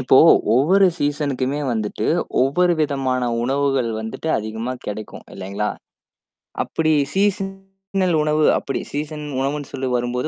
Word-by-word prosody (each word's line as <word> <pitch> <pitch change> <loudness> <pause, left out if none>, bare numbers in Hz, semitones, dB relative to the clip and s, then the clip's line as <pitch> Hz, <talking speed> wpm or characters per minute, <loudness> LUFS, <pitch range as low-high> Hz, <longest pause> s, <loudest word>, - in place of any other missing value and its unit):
இப்போ 130 +1 +4 0.4
ஒவ்வொரு 185 +10 +5
சீசனுக்குமே 145 -2 -1
வந்துட்டு, 110 -2 -2 0.4
ஒவ்வொரு 175 +7 +3
விதமான 135 -4 0 0.2
உணவுகள் 135 -1 +1
வந்துட்டு 110 +8 -5
அதிகமா 110 +3 -4
கிடைக்கும் 105 0 -6
இல்லேங்களா! 100 +2 -3 1.0
அப்பிடி 160 -1 0 0.2
சீசனல் 195 -2 -1
உணவு 155 0 +1
அப்பிடி 135 - -3
சீசன் 150 +1 -4
உணவுன்னு 140 +1 -2
சொல்லி 130 0 -2
வரும்போது. 120 +3 -1
140 Hz, 110 wpm, -21 LUFS, 125-160 Hz, 1.0 s, ஒவ்வொரு